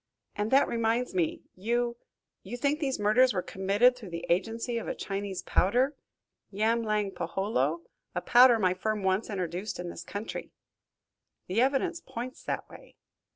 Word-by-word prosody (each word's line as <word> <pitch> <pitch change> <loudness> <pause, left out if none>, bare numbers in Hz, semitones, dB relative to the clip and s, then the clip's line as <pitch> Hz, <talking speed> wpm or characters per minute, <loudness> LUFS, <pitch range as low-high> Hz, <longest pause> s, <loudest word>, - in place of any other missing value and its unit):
And 205 +1 -1
that 270 +3 +5
reminds 230 +1 0
me, 175 -4 0
you 235 +4 0 0.5
you 225 +6 -6
think 285 +4 +1
these 270 -4 -1
murders 215 +5 +4
were 180 - 0
committed 200 +6 +3
through 225 -6 -10
the 170 0 -5
agency 225 +6 0
of - - -7
a - - -2
Chinese 195 -1 -4
powder 250 +9 +2 0.6
yamlang 215 -1 +1
peholo 170 - -1 0.3
a 180 - 0
powder 245 +2 +7
my 185 -4 +2
firm 210 +2 -2
once 190 +3 +1
introduced 185 0 -3
in 175 -1 -4
this 170 - -8
country." 205 +5 -6 1.0
"The 195 +6 +1
evidence 285 +6 +1
points 255 -2 -7
that - - -3
way." - - -15
215 Hz, 155 wpm, -29 LUFS, 190-245 Hz, 1.0 s, powder